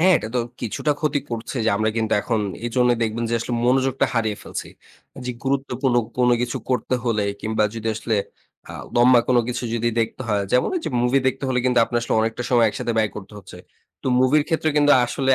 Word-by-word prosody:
হ্যাঁ 185 +2 +6
এটা 110 - -6
তো - - +2 0.2
কিছুটা 135 +6 -1
ক্ষতি 150 -2 0
করছে 115 +3 -5
যে 115 - +3
আমরা 110 +1 +1
কিন্তু 110 -1 0
এখন 115 -3 0 0.3
এজন্যই 120 0 +2
দেখবেন 115 +1 -1
যে - - +1
আসলে 120 +1 -3
মনোযোগটা 130 +1 +2
হারিয়ে 110 -3 0
ফেলছি। - - -6 0.6
যে 125 - -2
গুরুত্বপূর্ণ 135 -2 0 0.2
কোনো 125 -1 +4
কিছু 120 -1 -2
করতে 125 0 0
হলে 110 -3 +1 0.2
কিংবা 110 0 0
যদি 115 0 -3
আসলে 110 0 -1 0.6
আও - - -8
লম্বা 120 0 +6
কোনো 125 -1 +4
কিছু 125 0 -3
যদি 115 0 0
দেখতে 115 +3 -3
হয় 100 -1 +1
যেমন 125 - +3
ঐযে 325 - -3
মুভি 125 +3 +3
দেখতে 135 +1 -4
হলে 125 -1 +1
কিন্তু 125 -1 +3
আপনার 120 0 -1
আসলে - - -1
অনেকটা 115 +2 -1
সময় 120 -2 +5
একসাথে 115 +2 -3
ব্যয় 110 -2 +2
করতে 100 0 -9
হচ্ছে। 90 -2 -12 0.4
তো - - -6
মুভির 145 +4 +4
ক্ষেত্রে 160 -1 +1
কিন্তু 145 0 +5
আসলে 135 +2 -1
120 Hz, 205 wpm, -22 LUFS, 115-130 Hz, 0.6 s, হ্যাঁ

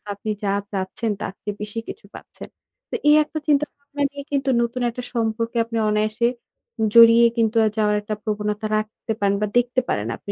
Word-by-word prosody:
আপনি 210 +2 -6
যা 200 - +1 0.2
চাচ্ছেন 200 +3 -2
তার - - -4
চেয়ে 205 - -4
বেশি 210 +2 -4
কিছু - - -9
পাচ্ছেন। - - -11 0.4
তো - - -2
এই 300 - +7
একটা 310 - -8
চিন্তাভাবনা 285 -1 -1
নিয়ে 285 0 -8
কিন্তু 275 -1 0
নতুন 235 +2 -2
একটা 245 +1 -7
সম্পর্কে 230 0 -1
আপনি 230 0 -4
অনায়াসে, 215 +2 +1 0.7
জড়িয়ে 230 0 +8
কিন্তু 225 0 +2
আ - - +4
যাওয়ার 210 -1 +2
একটা 210 +1 -4
প্রবণতা 210 0 -2
রাখতে 215 +1 -4
পারেন 200 0 +2
বা 210 - +1
দেখতে 245 +1 +2
পারেন, 105 +1 -1
আপনি 200 - -7
225 Hz, 180 wpm, -22 LUFS, 210-245 Hz, 0.7 s, জড়িয়ে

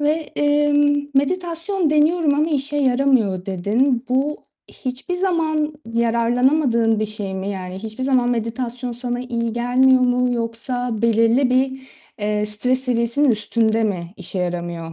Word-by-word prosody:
Ve, 295 0 +2 0.3
emm, 290 0 +2
"Meditasyon 340 +3 0
deniyorum 305 0 +3
ama 305 +3 +1
işe 285 0 -1
yaramıyor." 250 -9 +2
dedin. 230 +7 0
Bu 275 +4 0 0.3
hiçbir 260 +7 -5
zaman 320 -5 0 0.2
yararlanamadığın 235 0 +2
bir 215 - 0
şey 205 -3 -5
mi? 190 +1 -4
Yani, 185 -1 -6
hiçbir 220 +4 -6
zaman 255 -2 +2
meditasyon 240 +1 -3
sana 245 0 -4
iyi 235 -2 -3
gelmiyor 255 +2 +3
mu 250 0 +2
yoksa 230 0 -3
belirli 230 +3 +3
bir, 265 +1 +1 0.4
eee, 210 0 -1
stres 250 +5 +1
seviyesinin 250 +2 +1
üstünde 220 +1 +1
mi 180 -3 -3
işe 185 0 -5
yaramıyor? 175 -2 -4
245 Hz, 135 wpm, -20 LUFS, 220-285 Hz, 0.4 s, deniyorum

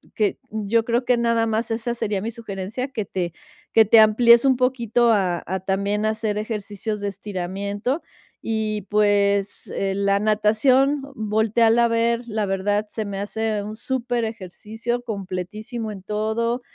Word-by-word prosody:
que 210 -2 +1
yo 220 +2 0
creo 240 +1 0
que 245 0 +3
nada 230 -1 +2
más 225 +1 -1
esa 230 +1 -1
sería 210 -4 -2
mi 230 - -3
sugerencia, 225 +2 -5
que 220 -6 -4
te 175 -3 -3 0.4
que 220 -1 +7
te 220 +2 +7
amplíes 235 +3 +6
un 260 -2 +4
poquito 240 -2 +2
a 185 -5 +1
a 190 +2 -2
también 200 +2 -1
hacer 215 -1 -1
ejercicios 210 -1 -4
de 205 - -2
estiramiento 200 - -3 0.4
y, 215 -2 -2
pues, 205 -1 +2
eh, 195 -1 -1
la 200 0 +2
natación, 220 +7 +3
voltéala 225 +1 +3
a - - +3
ver, 230 +1 +1
la 215 -2 -1
verdad 205 +2 0
se 220 - -4
me 200 -1 -5
hace 215 +1 -2
un 210 +1 -6
superejercicio, 230 -2 -3
completísimo 215 +2 -5
en 200 -2 -8
todo 220 +4 -1
215 Hz, 150 wpm, -23 LUFS, 200-230 Hz, 0.4 s, que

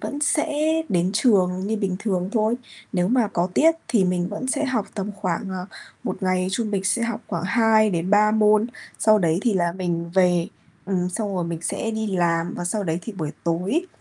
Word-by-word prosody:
vẫn 290 +1 -4
sẽ 300 +1 +1 0.2
đến 180 0 +1
trường 190 -5 +2
như 220 +1 -1
bình 195 -4 -1
thường 190 -4 -1
thôi. 220 0 +2 0.4
Nếu 180 0 +1
mà 240 -3 +2
có 175 -3 0
tiết 325 +1 +5
thì 225 -5 +3
mình 180 -1 0
vẫn 260 - -5
sẽ 290 +3 0
học 240 -7 -1
tầm 205 0 -3
khoảng, 190 0 -2
ờ, 185 -1 -5 0.4
1 - - -4
ngày 185 0 +1
trung 215 +2 -1
bình 195 -2 -1
sẽ 220 +4 +1
học 230 -2 -2
khoảng 175 -2 -3
2 220 +1 +4
đến 175 +1 -1
3 210 +1 +5
môn, 215 0 +4 0.3
sau 215 -1 +5
đấy 165 -3 +2
thì 235 - +2
là 175 -2 +1
mình 170 -2 -3
về. 180 -2 +3 0.4
Ừm, 180 -2 0
xong 205 +1 -3
rồi 180 -2 -1
mình 170 -1 -4
sẽ 225 - -2
đi 220 0 -2
làm 170 -1 +1
và - - -4
sau 205 +4 -1
đấy 165 -1 -1
thì 225 - -6
buổi 160 -6 -4
tối 185 - 0
195 Hz, 215 wpm, -23 LUFS, 180-220 Hz, 0.4 s, tiết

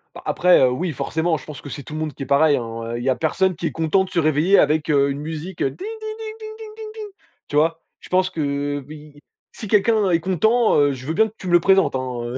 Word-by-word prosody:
Bah, - - -10
après, 180 0 +4
heu, 130 - +5
oui 170 +7 -2
forcément, 160 +2 -1
je - - -13
pense 150 -3 -9
que 145 - -9
c'est 140 +1 -7
tout 140 - -10
le 155 - -4
monde 155 -2 -3
qui 140 - -7
est - - -6
pareil, 145 +2 +4
hein? 115 0 -5
Il 120 - -5
y 135 - +1
a 130 - +2
personne 185 +3 0
qui 165 +1 -3
est - - -3
content 165 +6 +1
de - - -12
se 180 - 0
réveiller 155 +5 +3
avec, 155 +1 +2
heu, 140 -1 +3
une 140 - -5
musique, 160 +4 -6
heu, - - +2
ding, - - -13
ding, 390 - -6
ding, 435 0 -6
ding, 435 0 -8
ding, 440 -1 -9
ding, 440 - -7
ding, 430 -1 -7 0.4
tu - - -6
vois? 160 +2 +2 0.2
Je - - -15
pense 185 0 +2
que, 160 - -4
heu, 145 -1 -2
oui, 150 -1 -12 0.3
si 215 - -8
quelqu'un 210 0 +3
est 170 -2 +3
content, 220 +7 +2
heu, 145 -1 +3
je 130 -1 -9
veux 160 - -2
bien 220 +5 +3
que 220 - -16
tu 185 - -8
me - - -1
le 175 - +7
présentes, 195 -4 +3
hein, 125 -2 -3
heu 120 +2 -4
160 Hz, 290 wpm, -21 LUFS, 145-190 Hz, 0.4 s, le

